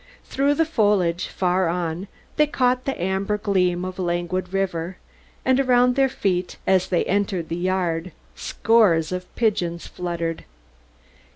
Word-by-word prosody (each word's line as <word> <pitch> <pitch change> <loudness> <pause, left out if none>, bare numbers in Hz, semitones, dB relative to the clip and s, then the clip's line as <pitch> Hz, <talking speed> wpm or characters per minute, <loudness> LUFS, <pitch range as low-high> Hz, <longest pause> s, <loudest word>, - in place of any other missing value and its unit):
Through 280 +1 +1
the 325 - +2
foliage, 205 - +1
farther 180 -1 +1
on, 175 +2 -2 0.3
they 300 0 +4
caught 255 -3 +1
the 270 - -2
amber 190 +3 0
gleam 185 -4 +1
of 185 0 -6
a - - 0
languid 175 +1 -2
river; 185 -2 -2 0.5
and 260 0 +3
around 250 -1 +4
their 270 0 +3
feet, 180 -7 -1
as 185 -1 +3
they 175 - +1
entered 190 -4 -1
the 165 - -2
yard, 180 -1 -1 0.2
scores 195 -9 +2
of 180 0 -4
pigeons 175 -7 0
fluttered. 170 -2 -4
185 Hz, 145 wpm, -23 LUFS, 175-220 Hz, 0.5 s, they